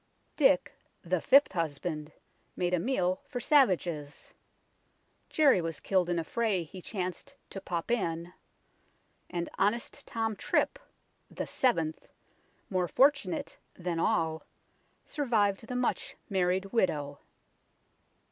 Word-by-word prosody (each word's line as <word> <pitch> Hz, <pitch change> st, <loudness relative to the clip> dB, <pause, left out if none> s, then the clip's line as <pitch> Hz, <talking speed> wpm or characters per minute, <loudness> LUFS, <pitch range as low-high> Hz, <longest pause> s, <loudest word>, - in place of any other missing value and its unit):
Dick, 265 Hz, -, +4 dB, 0.3 s
the 180 Hz, -1 st, 0 dB
fifth 280 Hz, +2 st, +6 dB
husband, 155 Hz, -2 st, -3 dB, 0.4 s
made 180 Hz, 0 st, -1 dB
a 180 Hz, -, +3 dB
meal 185 Hz, -4 st, 0 dB
for 245 Hz, -, -4 dB
savages; 175 Hz, -, +1 dB, 1.0 s
Jerry 285 Hz, -, +4 dB
was 165 Hz, -1 st, -4 dB
killed 185 Hz, -3 st, +1 dB
in 175 Hz, -, +1 dB
a 165 Hz, -, 0 dB
fray 210 Hz, -1 st, 0 dB
he 180 Hz, +4 st, -10 dB
chanced 185 Hz, +8 st, -5 dB
" -, -, -43 dB
to 195 Hz, -, -6 dB
pop 175 Hz, +3 st, -3 dB
in 170 Hz, -6 st, -1 dB, 0.5 s
"; -, -, -41 dB
and 175 Hz, -1 st, -3 dB
" -, -, -15 dB
honest 210 Hz, +5 st, 0 dB
Tom 225 Hz, -1 st, -1 dB
Trip," -, -, 0 dB, 0.5 s
the -, -, -4 dB
seventh, 165 Hz, -12 st, 0 dB, 0.6 s
more 185 Hz, -2 st, 0 dB
fortunate 270 Hz, -, +2 dB, 0.2 s
than 175 Hz, -2 st, -3 dB
all, 160 Hz, -5 st, +1 dB, 0.6 s
survived 225 Hz, -8 st, 0 dB
the 250 Hz, -, -4 dB
much 250 Hz, 0 st, -1 dB, 0.2 s
married 185 Hz, 0 st, +1 dB
widow. 145 Hz, -10 st, 0 dB
185 Hz, 125 wpm, -30 LUFS, 170-230 Hz, 1.0 s, fifth